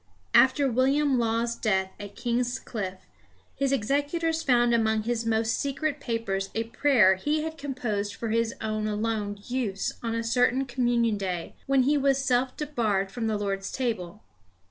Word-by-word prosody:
After 265 +2 +5
William 265 +2 +2
Law's 230 0 0
death 190 -4 0
at 205 0 -8
King's 245 +1 -1
Cliffe, 190 -5 -6 0.5
his 275 -1 0
executors 290 +7 0
found 240 -4 +3
among 220 -1 +2
his 230 0 -2
most 225 0 +1
secret 285 +2 -2
papers 195 -6 -2
a 225 - +1
prayer 230 -4 +4
he 300 +9 0
had 320 0 -4
composed 240 -8 -3
for 230 - -4
his 230 +1 0
own 215 0 -2
alone 210 -1 -2
use 235 -6 -2
on 230 -1 -2
a 230 - -1
certain 245 +3 +2
communion 240 -3 +1
day 180 -3 -3
when 270 -1 +4
he 290 +3 +3
was 275 -1 +3
self 255 -1 0
debarred 220 -10 -1
from 225 +1 -3
the 215 -1 0
Lord's 195 -1 -3
table. 215 -6 -3
235 Hz, 160 wpm, -27 LUFS, 215-265 Hz, 0.5 s, After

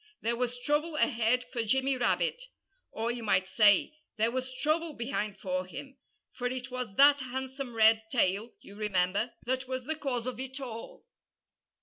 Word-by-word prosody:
There 235 +1 0
was 245 0 -2
trouble 295 +5 0
ahead 245 -2 +2
for 240 - 0
Jimmy 265 +4 +1
Rabbit 485 - 0 0.4
or, 225 +2 -2
you 240 0 -5
might 185 -4 +2
say, 210 - +4 0.2
there 225 +2 +2
was 255 +1 -3
trouble 310 +4 0
behind 225 -5 -3
for 185 -1 -2
him; 270 +8 -9 0.4
for 250 - -2
it 255 +1 -5
was 250 -5 -4
that 285 +3 +7
handsome 260 -1 -5
red 220 0 +6
tail, 210 -1 +1
you 200 - -13
remember, 205 +2 0
that 260 +1 -1
was 260 -1 -3
the 315 - -1
cause 260 -6 -2
of 255 -2 -4
it 265 +1 -6
all. 260 - -8
245 Hz, 165 wpm, -30 LUFS, 220-265 Hz, 0.4 s, that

